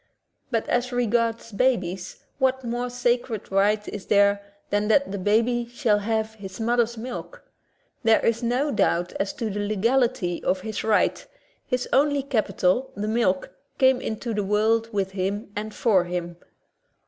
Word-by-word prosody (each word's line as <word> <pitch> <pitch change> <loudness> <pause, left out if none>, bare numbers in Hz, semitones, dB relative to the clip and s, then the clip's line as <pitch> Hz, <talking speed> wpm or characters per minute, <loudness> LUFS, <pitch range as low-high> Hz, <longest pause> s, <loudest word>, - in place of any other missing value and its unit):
But 230 -4 -1
as 245 +1 0
regards 230 -1 0
babies, 200 -3 -1 0.2
what 265 0 +1
more 240 +1 -2
sacred 240 -3 -1
right 205 +2 +2
is 200 -3 -7
there 200 0 +4 0.3
than 205 0 +1
that 275 +2 +3
the 200 - -3
baby 230 +5 +1
shall 235 -4 +2
have 220 +1 -1
its 190 0 -8
mother's 235 0 +1
milk? 255 - -7 0.6
There 225 -3 +3
is 230 +1 +1
no 250 +5 0
doubt 175 -5 +1
as 195 - 0
to 225 -2 -3
the 205 - -3
legality 215 -2 +1
of 185 0 0
his 215 +1 -4
right; 215 -1 +2 0.4
his 250 0 -1
only 285 0 +3
capital, 220 -2 0
the 205 +1 -3
milk, 215 -6 +1 0.3
came 260 -1 +4
into 225 +1 -3
the 210 -1 -1
world 220 +3 +1
with 195 -3 -1
him 200 +2 -3
and 215 +1 -4
for 200 -5 +2
him. 175 -1 -4
220 Hz, 155 wpm, -25 LUFS, 200-245 Hz, 0.6 s, there